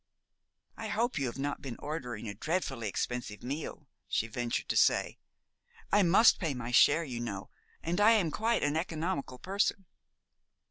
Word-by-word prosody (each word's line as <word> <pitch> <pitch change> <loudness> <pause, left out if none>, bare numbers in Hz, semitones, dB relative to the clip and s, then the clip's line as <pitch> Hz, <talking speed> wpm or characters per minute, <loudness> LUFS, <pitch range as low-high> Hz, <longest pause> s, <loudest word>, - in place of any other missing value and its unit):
"I 225 - -5
hope 225 - 0
you 135 - 0
have 120 - -5
not 140 +1 -3
been 130 -4 -6
ordering 125 -8 -5
a 100 - -4
dreadfully 135 - -2
expensive 115 0 -3
meal," 145 +2 -5 0.2
she - - 0
ventured 120 +1 -3
to - - 0
say. - - +3 0.7
"I 205 - +5
must 195 +5 +6
pay 160 -7 -1
my 125 -1 -5
share, 145 +6 +5
you 125 -6 -5
know, 100 -4 -5 0.3
and 175 +4 0
I 220 +2 +7
am 185 -8 +2
quite 225 +6 +1
an 145 +1 +1
economical 160 -5 -2
person." 195 - -1
145 Hz, 160 wpm, -31 LUFS, 120-185 Hz, 0.7 s, I